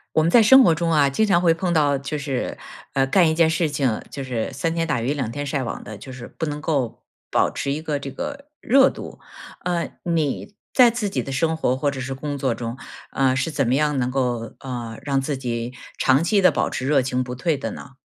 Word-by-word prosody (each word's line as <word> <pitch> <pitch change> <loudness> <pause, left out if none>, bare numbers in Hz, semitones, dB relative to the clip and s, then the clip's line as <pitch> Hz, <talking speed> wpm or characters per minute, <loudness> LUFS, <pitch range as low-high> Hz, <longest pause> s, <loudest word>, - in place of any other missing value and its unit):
我 155 - +4
们 165 - +2
在 235 - +7
生 265 +4 +8
活 170 - +5
中 165 0 0
啊， 145 -3 +4
经 220 +11 +2
常 175 -4 +3
会 170 -2 +5
碰 175 +1 -1
到 145 -3 +3
就 140 +3 -4
是， 140 -3 -3 0.4
呃， 135 - +2
干 170 +5 +4
一 160 - +1
件 160 -1 +4
事 165 0 +1
情， 135 -6 0
就 140 - -5
是 125 -1 -3
三 165 +5 -1
天 165 0 -1
打 150 -8 -1
鱼 130 +5 0
两 130 -6 -3
天 145 +2 -4
晒 140 -2 -2
网 - - -5
的， 110 -1 -9
就 130 - -10
是 125 -2 -9
不 160 - -1
能 150 0 -4
够 140 -7 -2 0.3
保 - - +3
持 140 - -3
一 150 +2 -3
个 150 -2 -2
这 140 -1 -7
个 280 - -6
热 270 +3 +5
度。 - - -8 0.5
呃， 175 -1 -1
你 165 +3 -1 0.2
在 250 -2 +7
自 215 -4 -2
己 - - -1
的 135 - -5
生 160 +5 +1
活 130 -5 0
或 145 +2 0
者 135 -1 -6
是 135 +1 -4
工 145 +1 -4
作 130 -3 0
中， 120 +2 -5 0.3
呃， 130 -1 +2
是 135 +5 -1
怎 145 -4 0
么 125 - +2
样 150 0 +1
能 125 -1 0
够， 125 -4 -2
呃， 120 -4 -6
让 140 -1 0
自 135 +1 -2
己 120 -2 -3 0.3
长 135 +3 +3
期 200 +4 +3
地 185 - +5
保 - - 0
持 130 - -3
热 140 -1 +3
情 130 0 -1
不 125 0 -6
退 150 +5 0
的 - - -4
呢？ 135 - -10
140 Hz, 265 characters per minute, -22 LUFS, 130-165 Hz, 0.5 s, 生